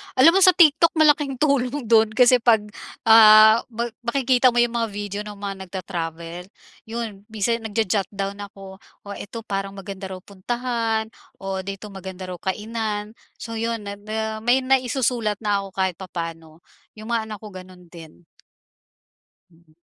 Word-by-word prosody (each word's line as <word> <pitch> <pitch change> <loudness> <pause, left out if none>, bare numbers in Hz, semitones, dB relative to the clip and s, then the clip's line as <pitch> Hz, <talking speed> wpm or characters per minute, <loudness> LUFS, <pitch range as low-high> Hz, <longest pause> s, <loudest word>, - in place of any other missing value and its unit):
alam 265 +6 +7
mo 380 - +3
sa 370 -2 +6
TikTok 330 -1 +5
malaking 295 -3 +3
tulong 275 -1 0
dun 225 -1 +4
kasi 250 +1 +5
'pag, 230 -2 +3 0.4
ah, 220 0 +8
ma 235 -1 -4 0.2
makikita 255 0 +3
mo - - -3
yung 240 - -1
mga 230 -1 -1
video 205 0 -5
ng 210 0 -8
mga 200 -1 -5
nagta-travel, 170 -1 -6 0.4
yun 220 -3 -6
minsan 220 +1 -1
nagjo-jot-down 200 -2 -2
ako, 195 -1 -13 0.2
o - - -16
eto 225 +3 -8
parang 195 -2 -4
maganda 195 0 -7
raw 190 - -6
puntahan 225 +2 -3 0.3
o 195 0 -4
dito 195 +2 -8
maganda 190 -1 -8
raw 180 - -6
kainan. 210 +2 -3 0.3
So, 225 0 -6
yun 230 -1 -2
may 200 0 -7
ma 220 +1 -4
may 245 +3 +2
may 265 +1 +3
maisusulat 230 -4 -1
na 205 -1 +1
ako, 195 - -8
kahit 190 -2 0
papaano, 165 -3 -7 0.3
yung 215 +2 -8
mga 225 -2 -1
anak 215 - -6
ko - - -7
ganun 185 -1 -12
din. 160 - -14 1.3
Mm. 165 -1 -26
215 Hz, 155 wpm, -22 LUFS, 195-235 Hz, 1.3 s, ah